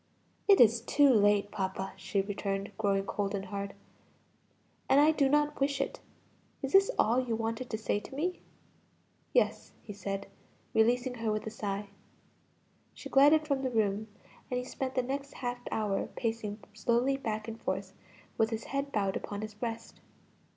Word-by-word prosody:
"It 400 -2 +7
is 230 0 +6
too 285 +4 +4
late, 205 -2 +4
papa," 190 0 -3
she 195 +1 -1
returned, 195 0 -3
growing 195 -2 +1
cold 200 0 -2
and 195 -1 -4
hard; 200 0 -5 1.1
"and 275 - +6
I 300 +2 +6
do 280 -3 +2
not 295 +1 +2
wish 275 0 +1
it. 275 - -2 0.6
Is 270 - -3
this 390 0 +6
all 235 +3 +4
you 235 -3 -1
wanted 225 +2 -3
to 220 - -2
say 215 -1 0
to 265 - -11
me?" 355 +5 -2 0.9
"Yes," - - +1
he 210 - -8
said, 195 0 -4 0.5
releasing 245 +3 +3
her 225 -1 +1
with 215 0 -2
a 220 - -4
sigh. 205 -2 -4 1.1
She - - -9
glided 295 +3 +6
from 280 -2 +1
the 260 - 0
room 215 -2 0 0.4
and 250 - -1
he 250 - -1
spent 260 0 -4
the 255 - +2
next 275 +2 -4
half 245 -1 -3
hour 210 -3 0
in - - -3
pacing 225 -3 -4
slowly 240 +5 +2
back 215 -5 -3
and 225 0 -7
forth - - -3 0.5
with 220 0 +4
his 225 0 -3
head 275 +1 -3
bowed 195 -4 0
upon 205 0 -4
his 215 0 -6
breast. 225 +2 -5
225 Hz, 170 wpm, -31 LUFS, 205-270 Hz, 1.1 s, It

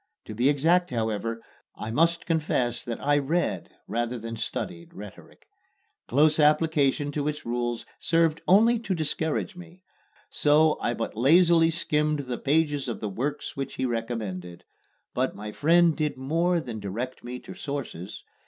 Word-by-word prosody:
To - - -7
be 120 +6 +2
exact, 165 +5 +3
however, 115 -1 -2 0.3
I 110 - -5
must 165 +6 +2
confess 135 -7 0
that 115 -1 -4
I 145 0 +4
read 160 +6 -1
rather 120 +1 -2
than 115 0 -6
studied 85 -5 -5
rhetoric. 105 -1 -12 0.6
Close 150 +4 +3
application 150 -2 +3
to 145 0 -2
its 150 0 -4
rules 120 0 -2
served 165 -1 +2
only 225 +5 +5
to 200 -4 -2
discourage 160 +4 -2
me, 180 +1 -13 0.4
so 155 +1 +3
I 120 - 0
but 115 - -4
lazily 165 +6 +5
skimmed 150 -2 0
the 125 -3 -5
pages 145 -2 +1
of 120 - -4
the 105 - -3
works 130 +9 -3
which 135 0 -4
he 130 - -1
recommended. 110 -7 -4 0.5
But - - -1
my 105 +1 -6
friend 165 +5 +4
did 150 -3 -1
more 165 +6 +1
than 120 -8 -6
direct 115 +6 -5
me 125 +1 -6
to - - -10
sources. 135 - -6
145 Hz, 155 wpm, -26 LUFS, 115-160 Hz, 0.6 s, only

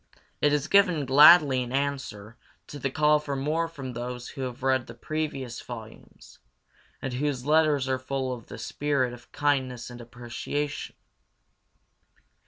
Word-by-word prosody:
It 145 - +4
is 150 +1 0
given 180 -7 +4
gladly 145 0 +7
in 125 -1 -5
answer 130 -6 -3 0.3
to 145 - -9
the 135 - -1
call 150 +2 +3
for 145 -2 -4
more 155 +5 0
from 135 -6 -7
those 125 +1 -5
who 135 - -8
have 130 0 -5
read 130 -1 +1
the 115 - -10
previous 135 -3 -4
volumes, 110 - -11 0.6
and 135 - -3
whose 135 -1 -2
letters 150 -3 +3
are 130 -1 0
full 130 0 -3
of 120 -3 -10
the - - -9
spirit 140 -4 -1
of 120 0 -14
kindness 130 -4 -1
and 120 0 -9
appreciation. 120 +5 -5
135 Hz, 150 wpm, -27 LUFS, 125-145 Hz, 0.6 s, gladly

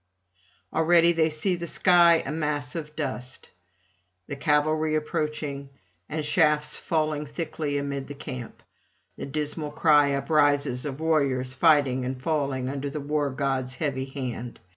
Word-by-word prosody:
Already 170 +1 +5
they 165 -1 +2
see 160 +5 0
the 170 0 -5
sky 170 -2 +5
a 140 - -3
mass 150 -3 -2
of 150 -2 -6
dust, 130 -4 -5 0.8
the 140 - -4
cavalry 155 +2 +1
approaching, 150 -2 -3 0.4
and 155 0 -3
shafts 150 -1 +2
falling 155 -2 -1
thickly 145 -1 -3
amid 140 -1 -3
the 145 - -8
camp; 125 -3 -8 0.5
the - - -6
dismal 150 +1 -3
cry 150 -2 +4
uprises 145 -2 +1
of 135 0 -6
warriors 140 -5 +1
fighting 140 -3 +3
and 130 +1 -4
falling 140 -3 -1
under 140 +1 -3
the 150 - -5
War 145 0 -1
god's 130 -1 -2
heavy 135 -4 -2
hand. 125 -3 -6
145 Hz, 140 wpm, -26 LUFS, 135-155 Hz, 0.8 s, Already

